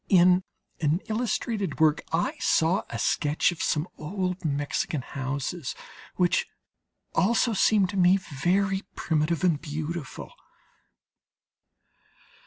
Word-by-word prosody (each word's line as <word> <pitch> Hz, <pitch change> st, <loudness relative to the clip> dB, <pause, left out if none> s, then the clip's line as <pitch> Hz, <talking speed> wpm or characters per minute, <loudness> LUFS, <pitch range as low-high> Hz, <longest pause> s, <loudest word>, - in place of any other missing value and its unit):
In 180 Hz, -1 st, +5 dB, 0.4 s
an 155 Hz, +2 st, +1 dB
illustrated 220 Hz, -3 st, -2 dB
work 155 Hz, -1 st, +4 dB
I 165 Hz, +1 st, 0 dB
saw 170 Hz, +5 st, +2 dB
a -, -, -4 dB
sketch 150 Hz, +3 st, +1 dB
of 175 Hz, -, -7 dB
some 155 Hz, +3 st, 0 dB
old 180 Hz, +3 st, -3 dB
Mexican 145 Hz, 0 st, -1 dB
houses 140 Hz, +4 st, -4 dB, 0.4 s
which 180 Hz, -1 st, +2 dB, 0.7 s
also 225 Hz, +6 st, +2 dB
seemed 200 Hz, -2 st, +3 dB
to 200 Hz, -, -4 dB
me 185 Hz, +1 st, +5 dB
very 190 Hz, +4 st, 0 dB
primitive 160 Hz, +1 st, 0 dB
and 165 Hz, -5 st, +2 dB
beautiful. 155 Hz, 0 st, -5 dB
175 Hz, 105 wpm, -26 LUFS, 150-190 Hz, 0.7 s, In